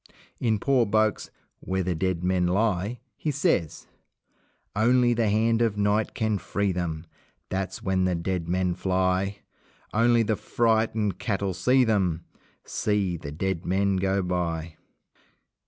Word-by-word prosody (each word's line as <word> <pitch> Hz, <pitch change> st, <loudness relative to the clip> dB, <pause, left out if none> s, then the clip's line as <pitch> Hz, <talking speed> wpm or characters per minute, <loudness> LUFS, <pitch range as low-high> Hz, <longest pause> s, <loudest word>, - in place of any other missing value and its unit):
In 110 Hz, -3 st, +1 dB
poor 125 Hz, +1 st, +2 dB
Boake's 110 Hz, +1 st, +1 dB, 0.3 s
"Where 95 Hz, 0 st, -2 dB
the 90 Hz, 0 st, -1 dB
Dead 90 Hz, +1 st, -1 dB
Men 90 Hz, -1 st, +2 dB
Lie" 100 Hz, +3 st, 0 dB, 0.2 s
he 155 Hz, -, -2 dB
says: 130 Hz, -, 0 dB, 0.9 s
Only 120 Hz, +3 st, +4 dB
the 115 Hz, -2 st, +1 dB
hand 115 Hz, +2 st, +2 dB
of 110 Hz, -3 st, +1 dB
Night 105 Hz, +1 st, +1 dB
can 110 Hz, -4 st, 0 dB
free 100 Hz, +1 st, -1 dB
them 85 Hz, -3 st, -3 dB, 0.4 s
That's 95 Hz, 0 st, -3 dB
when 95 Hz, -1 st, +1 dB
the 90 Hz, -1 st, +1 dB
dead 85 Hz, 0 st, -3 dB
men 90 Hz, 0 st, +1 dB
fly! 95 Hz, +2 st, 0 dB, 0.5 s
Only 115 Hz, +1 st, +4 dB
the 110 Hz, 0 st, 0 dB
frightened 110 Hz, -4 st, 0 dB
cattle 100 Hz, -4 st, -1 dB
see 125 Hz, +9 st, +3 dB
them 95 Hz, -8 st, 0 dB, 0.4 s
See 100 Hz, -4 st, 0 dB
the 70 Hz, -3 st, -7 dB
dead 95 Hz, +2 st, -2 dB
men 95 Hz, +1 st, +1 dB
go 95 Hz, +1 st, +1 dB
by! 85 Hz, -3 st, -2 dB
95 Hz, 140 wpm, -26 LUFS, 90-110 Hz, 0.9 s, Only